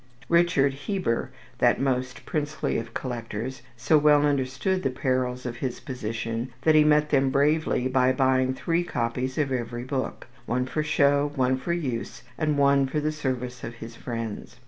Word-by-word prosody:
Richard 170 -5 +3
Heber, 145 - -2 0.3
that - - +4
most 130 -2 -1
princely 150 0 -1
of 115 0 -7
collectors, 120 0 -4 0.2
so 145 +6 +4
well 150 0 +5
understood 145 +7 0
the 135 - 0
perils 130 -1 -1
of 120 -1 -4
his 125 -1 -3
position 115 -1 -4
that 160 - +5
he 155 -1 +6
met 150 0 +3
them 135 -2 +3
bravely 145 -1 +2
by 130 0 +3
buying 130 0 +2
three 170 +5 0
copies 125 -3 -2
of 145 -3 0
every 120 -1 -3
book, 130 0 -3 0.2
one 125 +2 0
for 155 +4 -2
show, 145 -1 +2
one 130 -1 +2
for 130 +6 -4
use, 130 -9 -4
and 150 +1 0
one 140 -1 +4
for 150 +3 -1
the 155 +1 0
service 130 -4 -4
of 115 - -6
his 115 0 -9
friends. 115 -3 -6
130 Hz, 170 wpm, -26 LUFS, 125-150 Hz, 0.3 s, he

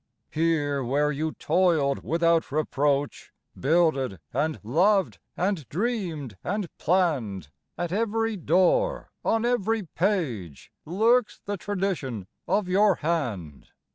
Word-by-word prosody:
Here 150 -4 +1
where 145 +4 +1
you 155 +2 -2
toiled 160 -5 +1
without 165 -1 +2
reproach, 145 -1 0 0.2
Builded 140 - +1
and 150 +4 0
loved 185 - +2 0.2
and 180 - -1
dreamed 170 - -3
and 200 -2 -3
planned, 135 - 0 0.3
At 175 0 -3
every 225 +2 0
door, - - +2
on 225 +1 +1
every 225 -3 +1
page, 150 - -2
Lurks 225 +7 +2
the 205 - -2
tradition 180 - -3 0.2
of 205 -3 +1
your 195 +1 +4
hand. 120 - -3
165 Hz, 110 wpm, -26 LUFS, 140-200 Hz, 0.3 s, your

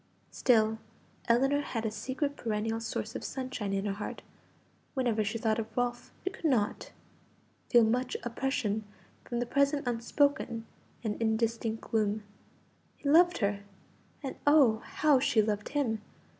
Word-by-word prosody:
Still 220 -3 +3 0.5
Ellinor 270 +5 +3
had 230 -5 -3
a 220 - 0
secret 260 +7 -2
perennial 225 -1 -2
source 225 - -4
of - - -4
sunshine 255 -6 -4
in 195 0 -1
her 200 - 0
heart; 205 +1 -6 0.7
whenever 240 -5 +1
she 215 +3 -2
thought 220 0 +1
of 220 0 -6
Ralph 245 0 -1
she 380 - -1
could 385 - -10
not 235 -9 +1 0.8
feel 240 -2 +7
much 250 +3 +1
oppression 235 -3 -1 0.4
from 240 - -3
the 245 - 0
present 280 +2 +1
unspoken 240 0 +1 0.4
and 215 0 -3
indistinct 225 0 0
gloom. 215 -1 0 0.7
He - - -6
loved 350 +4 +6
her; 200 0 -1 0.6
and 270 - -4
oh, 275 -7 +6
how 295 -4 +3
she 240 -3 +2
loved 210 -1 +1
him! 245 -7 0
230 Hz, 145 wpm, -30 LUFS, 220-265 Hz, 0.8 s, feel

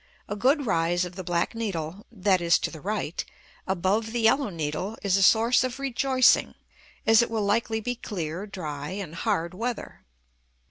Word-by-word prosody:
A 205 - -3
good 275 +6 +2
rise 175 -2 +1
of 180 0 -9
the 185 - -6
black 170 +3 0
needle 195 -4 -4
(that 190 -4 +1
is, 170 -1 +4
to - - -3
the 160 - -10
right) 205 -5 -2 0.4
above 195 +5 0
the 240 - 0
yellow 225 +3 +3
needle 170 +5 -3
is 195 -2 +2
a 195 - +2
source 230 +5 +5
of 255 0 -3
rejoicing, 265 -1 +3 0.5
as 225 0 +6
it 235 - 0
will 220 -2 -1
likely 220 +2 0
be 245 +3 -2
clear, 180 -4 -5
dry, 150 -7 -5
and 190 -5 -6
hard 170 -1 -1
weather. 230 +5 -5
200 Hz, 175 wpm, -26 LUFS, 175-230 Hz, 0.5 s, as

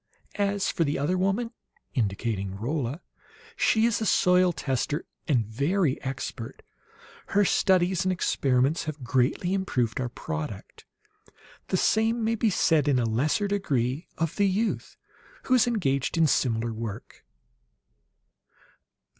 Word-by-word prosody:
"As 200 -1 +1
for 165 - +1
the 145 -1 -1
other 145 +6 0
woman," 195 +6 0 0.4
indicating 100 -4 -2
Rolla, 135 - -3 0.5
"she 220 0 +3
is 230 -1 +1
a - - 0
soil 180 -1 +4
tester, 145 -1 -2 0.2
and 125 -7 +2
very 140 - 0
expert. 130 -3 -6 0.6
Her 205 0 +3
studies 185 -1 +2
and 185 - +1
experiments 135 -4 +1
have 155 -3 -6
greatly 130 +8 +1
improved 130 - -1
our 125 - -2
product. 150 -7 -6 0.8
The 185 - 0
same 225 +4 +2
may 225 +1 +1
be 225 0 +1
said 160 -6 +2
in 140 -3 +3
lesser 125 - +1
degree 145 -8 -1
of 165 0 -2
the 200 -1 +3
youth, 210 +4 -1 0.5
who 255 - 0
is 250 -1 +5
engaged 165 - 0
in 165 - +5
similar 120 -5 +1
work." 110 -2 -7
155 Hz, 130 wpm, -27 LUFS, 125-195 Hz, 0.8 s, is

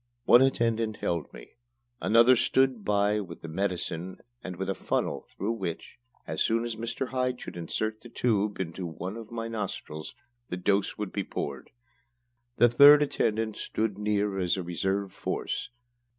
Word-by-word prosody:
One 120 - +8
attendant 115 -4 +1
held 85 -3 -2
me. - - -12 0.5
Another 115 +3 +6
stood 130 -1 +2
by 105 +1 +2
with 90 -5 -8
the - - -7
medicine 90 0 -3 0.3
and 95 -1 -5
with 95 +2 -4
a 95 - 0
funnel - - -2
through 100 +4 -3
which, 95 -1 -5 0.3
as - - -3
soon 115 +1 +2
as 120 -1 -3
Mr. 115 +3 -3
Hyde 125 -1 -1
should - - -8
insert 110 +6 -3
the 120 - -12
tube 105 -4 0
in 90 -4 -2
one 90 +2 -5
of 115 -2 -8
my 115 -1 -4
nostrils, 100 -6 -5 0.3
the 90 - -3
dose 100 +2 +1
was 105 -2 -3
to - - -23
be 100 - -2
poured. 70 -6 -5 0.9
The 120 - +7
third 145 +5 +8
attendant 110 -6 -1
stood 105 -2 -2
near 105 -1 0
as 90 0 +1
a 95 - -3
reserve 95 +3 -2
force. - - -3
105 Hz, 165 wpm, -28 LUFS, 95-115 Hz, 0.9 s, One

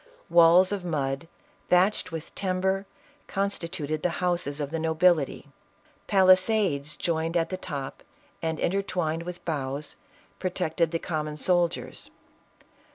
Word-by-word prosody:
Walls 175 +3 +7
of 200 -3 -2
mud, 140 -3 -2 0.4
thatched 185 +2 +3
with 165 -1 -7
timber, 190 +1 -1 0.4
con 200 0 0
stituted 155 -4 -4
the 180 - +1
houses 175 -5 -1
of 145 -1 -3
the 165 - -2
nobility; 160 -2 +2 0.6
palisades 185 -6 +3
joined 165 +1 -1
at 165 - 0
the 185 - -2
top, 140 -7 -6 0.4
and 160 -1 -2
intertwined 175 -4 -1
with 175 +1 -8
boughs, 145 -2 -3 0.4
protected 175 -3 0
the 165 - -1
common 155 -2 -3
soldiers. 175 0 0
170 Hz, 120 wpm, -27 LUFS, 155-185 Hz, 0.6 s, Walls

